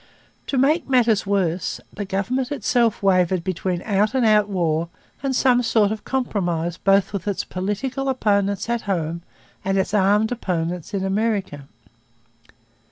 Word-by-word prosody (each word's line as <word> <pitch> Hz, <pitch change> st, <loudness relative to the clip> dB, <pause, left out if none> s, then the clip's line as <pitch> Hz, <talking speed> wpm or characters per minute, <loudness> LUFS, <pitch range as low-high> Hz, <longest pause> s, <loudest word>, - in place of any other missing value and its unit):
To 275 Hz, -, -1 dB
make 290 Hz, +5 st, +2 dB
matters 230 Hz, -6 st, +3 dB
worse, 185 Hz, -3 st, 0 dB
the 205 Hz, -, -5 dB
government 240 Hz, +8 st, -2 dB
itself 240 Hz, -7 st, +1 dB
wavered 185 Hz, -2 st, +2 dB
between 185 Hz, -1 st, -2 dB
out 210 Hz, +3 st, +1 dB
and 255 Hz, -3 st, +2 dB
out 210 Hz, -1 st, +4 dB
war 170 Hz, -3 st, 0 dB, 0.3 s
and 270 Hz, -1 st, -1 dB
some 250 Hz, -1 st, +4 dB
sort 220 Hz, -3 st, +2 dB
of 220 Hz, -, -5 dB
compromise 175 Hz, -10 st, -1 dB
both 195 Hz, +2 st, +2 dB
with 200 Hz, 0 st, -4 dB
its 200 Hz, -, -1 dB
political 245 Hz, +9 st, -3 dB
opponents 200 Hz, -5 st, 0 dB
at 235 Hz, -1 st, -1 dB
home 170 Hz, -2 st, -1 dB, 0.4 s
and 195 Hz, 0 st, 0 dB
its 190 Hz, 0 st, 0 dB
armed 210 Hz, +2 st, +3 dB
opponents 180 Hz, -4 st, -3 dB
in 190 Hz, -, -1 dB
America. 195 Hz, -8 st, -1 dB
200 Hz, 145 wpm, -22 LUFS, 185-230 Hz, 0.4 s, out